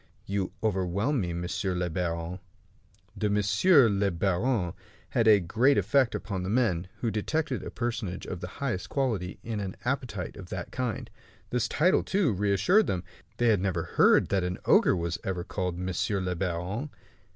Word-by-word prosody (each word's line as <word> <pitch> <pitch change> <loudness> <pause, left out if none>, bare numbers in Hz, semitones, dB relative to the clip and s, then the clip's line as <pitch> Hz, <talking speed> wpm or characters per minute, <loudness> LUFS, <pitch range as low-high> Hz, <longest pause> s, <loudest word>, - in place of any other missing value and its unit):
"You 100 -1 -2
overwhelm 100 +6 0
me, 85 -2 -2
monsieur 90 +2 -2
le 90 0 0
baron." 85 +1 -3 0.8
The 105 +1 0
"monsieur 105 - +5
le 100 -1 +1
baron" 95 +2 0 0.4
had 115 -1 +1
a 105 -2 +7
great 115 +10 +3
effect 135 -4 +2
upon 100 -2 -3
the 90 - -3
men, 100 -7 +1
who 115 - 0
detected 130 +5 -1
a - - -6
personage 115 -6 -3
of 90 - -5
the 90 - -4
highest 120 -10 -2
quality 110 -10 -1
in 115 -2 -3
an 95 -2 -4
appetite 125 -8 -3
of 90 -3 -10
that 90 -2 -5
kind. 125 -1 -3 0.4
This 125 -2 +1
title, 180 +5 +3
too, 190 - +1
reassured 105 - +3
them. 90 -1 -1 0.3
They 120 0 +3
had 105 -5 +3
never 90 -4 0
heard - - +4
that 95 -2 +1
an 90 0 -2
ogre - - +5
was 85 0 -2
ever 90 -2 -2
called 90 -2 -3
"monsieur 95 +2 -1
le 90 -1 -1
baron". 95 - -3
100 Hz, 170 wpm, -28 LUFS, 90-120 Hz, 0.8 s, a